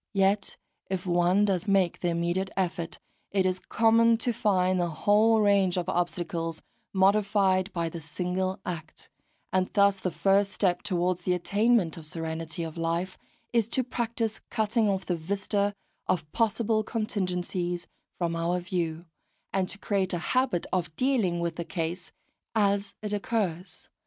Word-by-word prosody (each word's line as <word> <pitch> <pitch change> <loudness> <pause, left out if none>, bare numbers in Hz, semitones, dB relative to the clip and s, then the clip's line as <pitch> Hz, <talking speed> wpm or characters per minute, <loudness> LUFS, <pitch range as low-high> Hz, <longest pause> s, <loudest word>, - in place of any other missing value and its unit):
Yet 195 +1 +1 0.3
if 190 -1 -2
one 175 +3 +3
does 195 -1 0
make 195 -3 +2
the 175 - -1
immediate 175 +3 0
effort, 175 -2 -2 0.3
it 195 -1 +1
is 185 0 +1
common 230 +2 +4
to 235 +1 0
find 185 -4 +2
the 175 -1 +1
whole 210 +7 +4
range 200 -3 +3
of 180 -1 -1
obstacles 170 -2 -2 0.3
modified 195 -1 +3
by 170 -2 -1
the 165 +1 -6
single 180 +4 -2
act; 165 -3 -6 0.4
and 185 0 +2
thus 200 -1 +4
the 185 - -1
first 195 +5 +2
step 180 -3 +1
towards 180 -2 0
the 180 +1 +1
attainment 200 -1 +2
of 160 -2 -8
serenity 165 +1 -4
of 160 0 -6
life 170 +3 -2 0.3
is 230 -3 +3
to 255 +2 0
practise 230 -2 -2
cutting 220 -1 +1
off 190 -1 -1
the 180 - 0
vista 200 +4 -1 0.3
of 165 -5 -1
possible 220 -1 +1
contingencies 180 -5 -2 0.3
from 170 -2 -1
our 170 +2 0
view, 170 -2 -3 0.5
and 190 -1 0
to - - -4
create 195 -3 -1
a - - +1 0.2
habit 255 -9 +2
of 175 -4 -1
dealing 225 - +1
with 170 0 -2
a - - -1
case 170 +2 -4 0.4
as 200 -1 +1
it 210 -1 -2
occurs. 200 -4 -2
185 Hz, 150 wpm, -28 LUFS, 175-205 Hz, 0.5 s, common